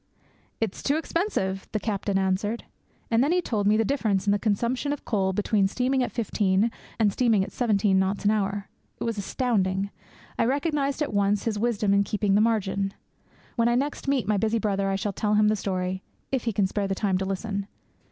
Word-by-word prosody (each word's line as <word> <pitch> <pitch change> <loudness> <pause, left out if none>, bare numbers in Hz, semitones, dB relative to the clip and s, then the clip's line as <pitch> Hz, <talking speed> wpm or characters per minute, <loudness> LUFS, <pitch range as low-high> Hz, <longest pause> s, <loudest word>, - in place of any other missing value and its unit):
'It 225 -4 0
is - - -10
too 285 - +1
expensive!' 315 - -1
the 215 - +1
captain 200 -1 -1
answered. 195 +4 0 0.5
And 230 +2 +4
then 290 - +2
he 360 - +3
told 215 - -1
me 210 +1 +4
the 225 - +2
difference 215 -8 0
in 200 - +3
the 205 - +2
consumption 235 +7 0
of 290 - -4
coal 195 -4 +1
between 205 0 +2
steaming 255 +5 0
at 250 - -1
fifteen 210 -1 +1 0.3
and 210 -3 +3
steaming 225 -5 +3
at 195 - -6
seventeen 205 -5 +2
knots 195 +2 -1
an 205 - +5
hour. 200 -1 -1 0.3
It - - -3
was 230 -3 -2
astounding. 200 -4 0 0.5
I - - +4
recognized 280 +2 0
at 285 - -4
once 200 0 +2
his 215 -3 -1
wisdom 215 -3 +1
in 200 0 +4
keeping 205 -1 0
the 205 - +5
margin. 200 -3 0 0.6
When 230 0 +3
I 240 - +3
next 280 +3 -2
meet 270 -6 +1
my 210 -1 +2
busy 220 +3 +1
brother, 200 -2 0
I 195 - +1
shall 200 +1 -2
tell 210 +2 0
him 210 0 +4
the 215 - +2
story 185 -2 -2 0.3
if 265 -3 -1
he 230 - +1
can 200 -1 +1
spare 200 +1 -1
the 195 - -1
time 190 -2 0
to 190 - -1
listen. 195 +1 -3
210 Hz, 210 wpm, -26 LUFS, 195-235 Hz, 0.6 s, an